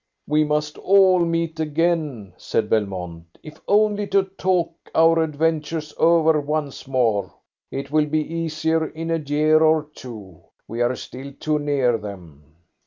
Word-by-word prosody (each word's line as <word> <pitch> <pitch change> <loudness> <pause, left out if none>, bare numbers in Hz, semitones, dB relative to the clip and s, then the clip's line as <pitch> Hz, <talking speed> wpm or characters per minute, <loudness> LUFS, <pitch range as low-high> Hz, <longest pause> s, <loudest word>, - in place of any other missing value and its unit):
"We 150 +1 +3
must 150 0 -2
all 190 -1 +5
meet 165 -1 -1
again," 155 - -1
said 105 +3 -2
Belmont, 90 -6 -3
"if 155 0 -12
only 210 0 +2
to 195 -1 +3
talk 185 -3 -1 0.2
our 165 0 +5
adventures 155 0 -1
over 160 -2 +4
once 145 -2 -4
more. 115 -7 +1 0.4
It 135 +1 -6
will 155 0 +2
be 155 +1 0
easier 160 -1 -1
in 165 +2 -5
a 165 - +1
year 155 +1 +2
or 155 -1 +4
two. 105 -9 -11 0.3
We 115 +2 -4
are 120 +1 +1
still 135 +3 -9
too 155 -1 0
near 135 -5 +1
them." 90 -8 -10
155 Hz, 145 wpm, -22 LUFS, 125-165 Hz, 0.4 s, all